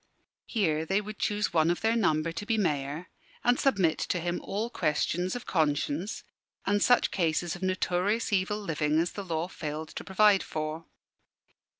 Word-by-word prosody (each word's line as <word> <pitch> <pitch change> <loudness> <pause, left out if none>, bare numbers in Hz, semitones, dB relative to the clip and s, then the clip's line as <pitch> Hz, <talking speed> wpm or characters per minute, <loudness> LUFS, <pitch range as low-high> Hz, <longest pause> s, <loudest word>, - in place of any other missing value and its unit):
Here 160 -9 +1
they 190 +5 +1
would 210 0 -7
choose 210 -2 0
one 160 -1 +4
of 175 - 0
their 225 +1 +2
number 165 -7 +2
to 205 - -5
be 225 - +2
Mayor, 150 -3 -1 0.3
and 245 +1 +3
submit 190 - +2
to 180 - -1
him 175 +1 -2
all 220 +4 -3
questions 175 +4 0
of 245 - -6
conscience, 155 +3 0 0.4
and 205 +1 +2
such 245 +3 +4
cases 170 -1 0
of 180 - -10
notorious 185 +4 0
evil 195 +2 +1
living 155 -6 0
as 170 +1 0
the 200 - -6
law 165 -2 -2
failed 155 -3 -5
to - - -7
provide 200 0 +4
for. 155 +1 -4
180 Hz, 170 wpm, -29 LUFS, 160-205 Hz, 0.4 s, one